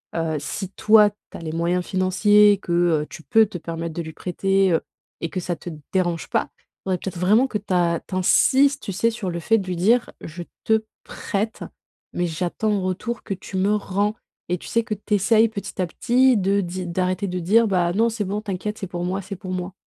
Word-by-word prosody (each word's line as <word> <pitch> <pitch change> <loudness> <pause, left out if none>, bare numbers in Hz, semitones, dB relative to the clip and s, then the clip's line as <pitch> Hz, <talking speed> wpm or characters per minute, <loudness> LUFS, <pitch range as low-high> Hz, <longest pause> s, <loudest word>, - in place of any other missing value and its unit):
heu, 165 -2 -1
si 180 +6 -5
toi, 210 +1 +5
tu 205 +1 -14
as - - -10
les 160 -1 -5
moyens 170 +2 0
financiers 205 +2 +4
que, 175 - -7 0.3
heu, - - -10
tu 160 +1 -10
peux 225 +2 +4
te 200 -3 -7
permettre 165 0 -5
de 170 - -2
lui 160 0 -8
prêter, 195 +2 +1
heu, 165 - +2 0.4
et 165 - -2
que 185 - -3
ça 175 0 -2
te 175 - -8 0.2
dérange 175 -3 0
pas, - - 0 0.4
il 190 - -1
faudrait 185 - +1
peut-être 185 -1 -6
vraiment 215 +9 +4
que 230 - -2
ta 175 -4 +1
tu 185 - -5
insistes, 270 +9 +3
tu 195 - -4
sais, 230 +5 +2
sur 220 -5 -4
le 170 - -4
fait 225 +6 +3
de 195 -3 -4
lui 180 - -2
dire: 230 +7 +2
«Je 170 +2 -7 0.2
te 220 0 +3 0.2
prête, 215 +1 -3 0.5
mais 175 - 0
j'attends 175 +6 -2
en 200 - 0
retour 195 +6 -3
que 200 - -3
tu 190 - -10
me 200 +3 +2
rends», 205 +1 -1 0.3
et 180 - +1
tu - - -11
sais, 230 - +1
que 215 - -3
tu 210 +1 -5
essaies 215 +3 +4
petit 200 -2 -7
à - - +2
petit 255 +6 +3
de 200 +1 +2
di 180 0 -5
d'arrêter 185 +2 -1
de 180 -1 -3
dire: 220 +7 +4
«Bah, 175 -3 +1
non, 225 +4 +3
c'est 225 -2 -3
bon, 205 +3 -3
t'inquiète, 210 +1 -4
c'est 195 - -4
pour 175 0 -5
moi, 190 +2 -2
c'est 195 +1 -7
pour 185 -1 -7
moi». 180 0 -4
190 Hz, 230 wpm, -23 LUFS, 175-210 Hz, 0.5 s, toi